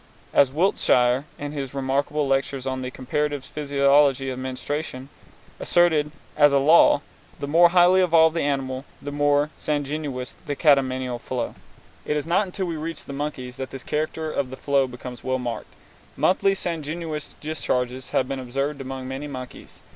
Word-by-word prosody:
As 135 Hz, -2 st, +5 dB
Wiltshire, 135 Hz, -6 st, +2 dB
in 145 Hz, 0 st, -5 dB
his 140 Hz, -2 st, -5 dB
remarkable 140 Hz, +2 st, 0 dB
lectures 135 Hz, 0 st, 0 dB
on 130 Hz, -1 st, -2 dB
the 125 Hz, -, -4 dB
"Comparative 145 Hz, +2 st, -2 dB
Physiology 140 Hz, -2 st, +2 dB
of 130 Hz, -, -5 dB
Menstruation," 130 Hz, +1 st, -4 dB, 0.5 s
asserted 160 Hz, -4 st, +3 dB, 0.3 s
as 145 Hz, -1 st, +6 dB
a 140 Hz, -, +4 dB
law, 145 Hz, +1 st, +6 dB, 0.4 s
the 140 Hz, -, -5 dB
more 170 Hz, +4 st, +6 dB
highly 180 Hz, +1 st, +5 dB
evolved 165 Hz, -2 st, +5 dB
the 165 Hz, -, +1 dB
animal, 135 Hz, -2 st, -1 dB, 0.2 s
the 145 Hz, -, -6 dB
more 145 Hz, +1 st, +2 dB
sanguineous 145 Hz, -3 st, -3 dB
the 145 Hz, -, -1 dB
catamenial 130 Hz, -4 st, +2 dB
flow. 125 Hz, -2 st, -3 dB, 0.5 s
It 150 Hz, -, -1 dB
is 145 Hz, -, -2 dB
not 190 Hz, +5 st, +2 dB
until 185 Hz, +1 st, -3 dB
we 170 Hz, -2 st, -3 dB
reach 160 Hz, +1 st, -6 dB
the 140 Hz, -, -7 dB
monkeys 135 Hz, -3 st, -5 dB
that 130 Hz, -1 st, -5 dB
this 135 Hz, -1 st, -8 dB
character 155 Hz, +1 st, -2 dB
of 140 Hz, -3 st, -2 dB
the 130 Hz, -, -8 dB
flow 140 Hz, -2 st, +1 dB
becomes 125 Hz, 0 st, -9 dB
well 130 Hz, 0 st, 0 dB
marked. 120 Hz, -2 st, -5 dB, 0.4 s
Monthly 195 Hz, +1 st, +3 dB
sanguineous 160 Hz, -3 st, -4 dB
discharges 130 Hz, -4 st, -2 dB
have 130 Hz, -, +1 dB
been 135 Hz, 0 st, -3 dB
observed 135 Hz, +3 st, -3 dB
among 130 Hz, -1 st, -6 dB
many 135 Hz, +3 st, -5 dB
monkeys. 130 Hz, -3 st, -9 dB
140 Hz, 160 wpm, -24 LUFS, 130-150 Hz, 0.5 s, as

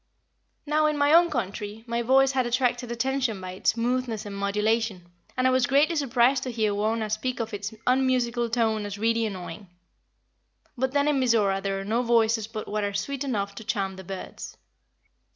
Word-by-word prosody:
Now, 305 Hz, +1 st, +2 dB
in 300 Hz, -1 st, 0 dB
my 290 Hz, +1 st, +3 dB
own 340 Hz, +1 st, +6 dB
country, 210 Hz, -, -4 dB
my 235 Hz, 0 st, -1 dB
voice 265 Hz, +3 st, +4 dB
had 260 Hz, -2 st, 0 dB
attracted 245 Hz, 0 st, 0 dB
attention 250 Hz, -2 st, -1 dB
by 185 Hz, -1 st, -6 dB
its 185 Hz, -, +1 dB
smoothness 235 Hz, -1 st, -1 dB
and 200 Hz, -1 st, -6 dB
modulation, 210 Hz, -1 st, 0 dB, 0.3 s
and 255 Hz, -, +1 dB
I 260 Hz, -, +5 dB
was 255 Hz, 0 st, +2 dB
greatly 290 Hz, +5 st, +3 dB
surprised 260 Hz, -2 st, +2 dB
to 255 Hz, -, -4 dB
hear 220 Hz, -3 st, 0 dB
Wauna 215 Hz, +2 st, 0 dB
speak 245 Hz, +4 st, -2 dB
of 225 Hz, -1 st, -4 dB
its 205 Hz, +1 st, -4 dB
unmusical 250 Hz, -2 st, +1 dB
tone 220 Hz, -3 st, 0 dB
as 205 Hz, 0 st, -6 dB
really 230 Hz, +1 st, +1 dB
annoying. 185 Hz, -1 st, -7 dB, 1.1 s
But 260 Hz, +1 st, -1 dB
then 285 Hz, 0 st, +2 dB
in 295 Hz, -2 st, +2 dB
Mizora 215 Hz, -6 st, +2 dB
there 195 Hz, 0 st, -2 dB
are 195 Hz, -, -6 dB
no 225 Hz, +4 st, +1 dB
voices 230 Hz, -2 st, +2 dB
but 220 Hz, -1 st, -6 dB
what 210 Hz, 0 st, -2 dB
are 200 Hz, 0 st, -2 dB
sweet 275 Hz, +6 st, -2 dB
enough 200 Hz, -7 st, -2 dB
to 210 Hz, -, -9 dB
charm 195 Hz, -3 st, -2 dB
the 190 Hz, -, -9 dB
birds. 190 Hz, +1 st, -8 dB
230 Hz, 190 wpm, -26 LUFS, 205-255 Hz, 1.1 s, own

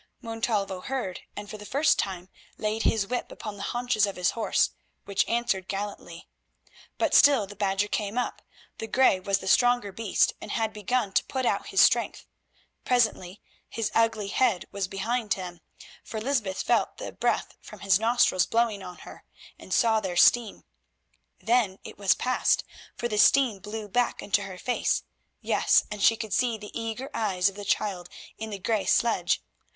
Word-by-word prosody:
Montalvo 215 Hz, -4 st, -2 dB
heard, 245 Hz, -7 st, -4 dB, 0.2 s
and 205 Hz, 0 st, -7 dB
for 215 Hz, -, -8 dB
the -, -, -9 dB
first 290 Hz, +7 st, +2 dB
time 185 Hz, -2 st, -3 dB, 0.3 s
laid 215 Hz, +1 st, -2 dB
his 220 Hz, -3 st, +2 dB
whip 245 Hz, +4 st, -4 dB
upon 215 Hz, -2 st, -7 dB
the -, -, -8 dB
haunches 240 Hz, -4 st, +1 dB
of 200 Hz, -, -5 dB
his 180 Hz, -1 st, +1 dB
horse, 230 Hz, -, +1 dB, 0.3 s
which 200 Hz, -1 st, 0 dB
answered 230 Hz, -6 st, 0 dB
gallantly. 195 Hz, -4 st, -6 dB, 0.7 s
But -, -, 0 dB
still 275 Hz, -7 st, +6 dB
the 205 Hz, +1 st, -12 dB
Badger 200 Hz, 0 st, 0 dB
came 210 Hz, +1 st, -3 dB
up. 250 Hz, -, -2 dB, 0.4 s
The 225 Hz, -, -4 dB
grey 255 Hz, -6 st, +3 dB
was 195 Hz, +1 st, 0 dB
the -, -, -8 dB
stronger 245 Hz, -1 st, +3 dB
beast, 210 Hz, 0 st, +1 dB
and -, -, -6 dB
had 220 Hz, -1 st, -1 dB
begun 215 Hz, +1 st, -1 dB
to -, -, +3 dB
put 260 Hz, -1 st, -3 dB
out -, -, 0 dB
his -, -, +3 dB
strength. -, -, +3 dB, 0.6 s
Presently 220 Hz, -6 st, 0 dB, 0.3 s
his 225 Hz, -2 st, -3 dB
ugly 225 Hz, -3 st, +1 dB
head 225 Hz, -5 st, +1 dB
was 200 Hz, -2 st, -2 dB
behind 215 Hz, +3 st, -1 dB
them, 180 Hz, -3 st, -7 dB, 0.4 s
for 220 Hz, -, -6 dB
Lysbeth 215 Hz, -6 st, -1 dB
felt -, -, +1 dB
the -, -, -6 dB
breath -, -, -1 dB
from -, -, -12 dB
his 195 Hz, -1 st, +3 dB
nostrils 225 Hz, -5 st, +3 dB
blowing 225 Hz, -3 st, +1 dB
on 180 Hz, -1 st, -9 dB
her, -, -, -12 dB, 0.4 s
and -, -, -13 dB
saw 225 Hz, -2 st, +3 dB
their 185 Hz, -4 st, -4 dB
steam. 230 Hz, +2 st, +4 dB, 0.8 s
Then 225 Hz, -5 st, +1 dB
it -, -, -11 dB
was 200 Hz, -2 st, +3 dB
past, 255 Hz, 0 st, +1 dB, 0.3 s
for 240 Hz, -, -2 dB
the 210 Hz, -3 st, -1 dB
steam 245 Hz, -3 st, +4 dB
blew 210 Hz, +1 st, -6 dB
back 245 Hz, +4 st, 0 dB
into 205 Hz, 0 st, +1 dB
her 190 Hz, -2 st, -8 dB
face; 245 Hz, +6 st, 0 dB, 0.4 s
yes, -, -, +3 dB
and 210 Hz, -1 st, -5 dB
she 225 Hz, +3 st, +5 dB
could 220 Hz, -3 st, -5 dB
see 240 Hz, -3 st, +1 dB
the 210 Hz, -1 st, -10 dB
eager 230 Hz, +3 st, -5 dB
eyes 200 Hz, -4 st, +1 dB
of 195 Hz, -, -13 dB
the 205 Hz, -, -7 dB
child 190 Hz, -3 st, -1 dB, 0.3 s
in 220 Hz, 0 st, -5 dB
the 205 Hz, -, -5 dB
grey 205 Hz, +2 st, -1 dB
sledge. 235 Hz, -1 st, +2 dB
210 Hz, 175 wpm, -27 LUFS, 195-235 Hz, 0.8 s, still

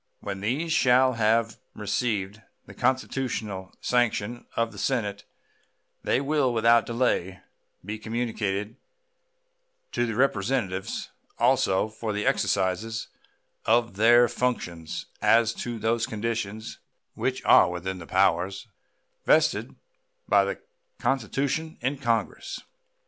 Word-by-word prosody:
When 95 Hz, -1 st, -5 dB
these 145 Hz, +10 st, -1 dB
shall 130 Hz, -2 st, +4 dB
have 115 Hz, 0 st, +1 dB, 0.2 s
received 105 Hz, -1 st, -2 dB, 0.2 s
the -, -, -12 dB
constitutional 120 Hz, -7 st, -2 dB
sanction 120 Hz, -1 st, 0 dB
of 115 Hz, 0 st, 0 dB
the -, -, -10 dB
Senate, 105 Hz, -6 st, -1 dB, 0.8 s
they -, -, +1 dB
will 140 Hz, -2 st, +1 dB
without 115 Hz, 0 st, +4 dB
delay 115 Hz, -6 st, 0 dB, 0.4 s
be 105 Hz, +2 st, -5 dB
communicated 110 Hz, -2 st, -3 dB, 1.1 s
to 120 Hz, -, 0 dB
the 115 Hz, -, -3 dB
Representatives 100 Hz, -6 st, -1 dB, 0.3 s
also 120 Hz, -6 st, +3 dB
for 110 Hz, 0 st, -5 dB
the 105 Hz, 0 st, -2 dB
exercise 105 Hz, +4 st, 0 dB, 0.6 s
of 115 Hz, -1 st, +2 dB
their 120 Hz, +3 st, +6 dB
functions 90 Hz, -11 st, -3 dB, 0.2 s
as 115 Hz, 0 st, +4 dB
to 120 Hz, -1 st, -5 dB
those 115 Hz, +1 st, 0 dB
conditions 110 Hz, -2 st, -4 dB, 0.3 s
which -, -, -2 dB
are 90 Hz, -, +7 dB
within 90 Hz, +1 st, -4 dB
the 85 Hz, -, -10 dB
powers 95 Hz, +2 st, +1 dB, 0.6 s
vested -, -, +3 dB, 0.5 s
by 100 Hz, -1 st, +5 dB
the 100 Hz, -, -3 dB, 0.4 s
Constitution 135 Hz, +5 st, -1 dB
in 130 Hz, +3 st, -2 dB
Congress. 115 Hz, -4 st, -1 dB
115 Hz, 110 wpm, -26 LUFS, 100-125 Hz, 1.1 s, are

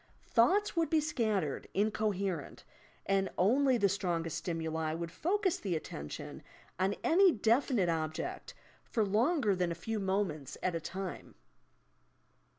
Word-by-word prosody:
Thoughts 380 Hz, -, +3 dB
would 330 Hz, -1 st, +1 dB
be 320 Hz, -, +4 dB
scattered, 215 Hz, -, -1 dB
incoherent, 200 Hz, -5 st, -1 dB, 0.4 s
and 195 Hz, -1 st, +1 dB
only 255 Hz, +7 st, +4 dB
the 200 Hz, -3 st, +3 dB
strongest 175 Hz, -4 st, -1 dB
stimuli 160 Hz, -2 st, -2 dB
would 170 Hz, 0 st, -4 dB
focus 375 Hz, -, 0 dB
the 190 Hz, -4 st, -2 dB
attention 75 Hz, -, -6 dB, 0.4 s
on 190 Hz, +2 st, +1 dB
any 370 Hz, +3 st, +6 dB
definite 230 Hz, -, +2 dB
object 160 Hz, -2 st, -3 dB, 0.3 s
for 220 Hz, -3 st, 0 dB
longer 220 Hz, -, +2 dB
than 180 Hz, -2 st, 0 dB
a -, -, -2 dB
few 215 Hz, +6 st, -3 dB
moments 190 Hz, -8 st, -2 dB
at 185 Hz, -, +1 dB
a 165 Hz, -, -2 dB
time. 185 Hz, +2 st, -6 dB
195 Hz, 130 wpm, -32 LUFS, 170-240 Hz, 0.4 s, any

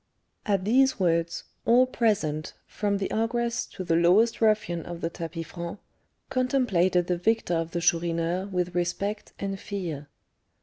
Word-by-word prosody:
At 195 Hz, -3 st, +1 dB
these 265 Hz, +4 st, +3 dB
words, 170 Hz, -2 st, +1 dB, 0.2 s
all 245 Hz, +2 st, +5 dB
present, 195 Hz, -12 st, 0 dB
from 205 Hz, -1 st, -1 dB
the 195 Hz, -, -3 dB
ogress 235 Hz, +1 st, 0 dB
to 185 Hz, -, -7 dB
the 165 Hz, -2 st, +1 dB
lowest 190 Hz, +9 st, +4 dB
ruffian 210 Hz, -6 st, +2 dB
of 175 Hz, -1 st, -7 dB
the 165 Hz, -, -2 dB
tapis 165 Hz, 0 st, -5 dB
franc, 170 Hz, +3 st, -6 dB, 0.5 s
contemplated 215 Hz, -9 st, +2 dB
the 175 Hz, -1 st, -1 dB
victor 220 Hz, -1 st, +1 dB
of 165 Hz, -1 st, 0 dB
the 170 Hz, 0 st, -3 dB
Chourineur 170 Hz, +2 st, +1 dB
with 180 Hz, -2 st, -2 dB
respect 195 Hz, +4 st, -2 dB
and 195 Hz, -1 st, -4 dB
fear. 175 Hz, -9 st, -5 dB
185 Hz, 145 wpm, -27 LUFS, 170-220 Hz, 0.5 s, all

